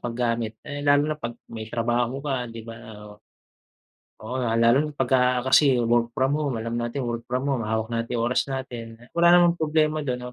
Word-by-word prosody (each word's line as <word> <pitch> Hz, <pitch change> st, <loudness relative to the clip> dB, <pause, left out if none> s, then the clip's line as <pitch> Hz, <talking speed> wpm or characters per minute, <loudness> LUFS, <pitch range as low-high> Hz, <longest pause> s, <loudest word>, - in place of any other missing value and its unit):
paggamit. 115 Hz, -2 st, -2 dB
Eh, 145 Hz, 0 st, -6 dB
lalo 145 Hz, +1 st, +3 dB
na 150 Hz, -, -9 dB
'pag 120 Hz, -2 st, -5 dB, 0.2 s
may 110 Hz, -1 st, -6 dB
trabaho 120 Hz, +4 st, -1 dB
ka, 130 Hz, -4 st, -2 dB
'di 115 Hz, -1 st, -9 dB
ba? 115 Hz, 0 st, -9 dB, 0.3 s
Oo. 105 Hz, 0 st, -12 dB, 1.1 s
Oo 130 Hz, +3 st, -3 dB
nga 115 Hz, -2 st, 0 dB
lalo 115 Hz, +3 st, +5 dB
na -, -, -6 dB
pagka 125 Hz, -1 st, +2 dB
kasi 135 Hz, 0 st, +5 dB
work 120 Hz, 0 st, +2 dB
from 135 Hz, +1 st, +2 dB
home, 140 Hz, -5 st, -1 dB
alam 115 Hz, +1 st, -3 dB
natin 120 Hz, +3 st, -3 dB
work 120 Hz, 0 st, -4 dB
from 125 Hz, +2 st, -1 dB
home, 130 Hz, -, -1 dB
hawak 110 Hz, +1 st, -2 dB
natin 115 Hz, +1 st, -2 dB
oras 120 Hz, +4 st, 0 dB
natin. 125 Hz, -4 st, -6 dB, 0.2 s
Wala 170 Hz, 0 st, +4 dB
namang 175 Hz, -1 st, +3 dB
problema 155 Hz, 0 st, +1 dB
do'n, 125 Hz, -3 st, -4 dB
125 Hz, 190 wpm, -24 LUFS, 115-135 Hz, 1.1 s, lalo